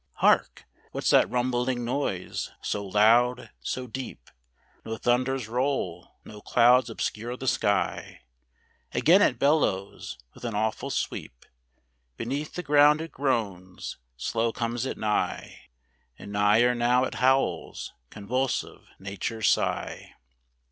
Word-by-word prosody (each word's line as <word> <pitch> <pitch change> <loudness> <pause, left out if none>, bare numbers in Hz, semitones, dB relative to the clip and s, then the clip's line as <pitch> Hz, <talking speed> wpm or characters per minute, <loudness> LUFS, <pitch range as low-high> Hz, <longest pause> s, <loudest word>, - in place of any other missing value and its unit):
Hark! - - +2 0.3
what's - - 0
that - - +5
rumbling 125 0 0
noise, 120 -8 -2
so 105 - -2
loud, 115 +5 +3
so 130 - -4
deep? 125 - -8 0.5
No 110 0 -5
thunders 125 0 0
roll, 120 -8 -2
no 105 -1 -11
clouds 125 +2 +4
obscure 115 +2 -4
the 130 - -7
sky: 100 -4 0 0.7
Again 180 +6 +5
it 125 - +3
bellows, 110 - 0 0.2
with - - -16
an 115 -3 -3
awful 110 0 -1
sweep - - -4 0.7
Beneath 140 +6 -4
the 180 - -4
ground 145 0 +5
it 165 +1 -6
groans, 100 - -3 0.2
slow 115 - 0
comes 120 +2 -2
it - - -4
nigh, 105 -1 -2 0.5
And 100 - -10
nigher 105 +4 +4
now 120 +1 +2
it - - -2
howls, 130 -10 +1 0.2
convulsive 125 +6 -3
nature's 100 +3 -1
sigh. - - -2
120 Hz, 120 wpm, -27 LUFS, 105-130 Hz, 0.7 s, that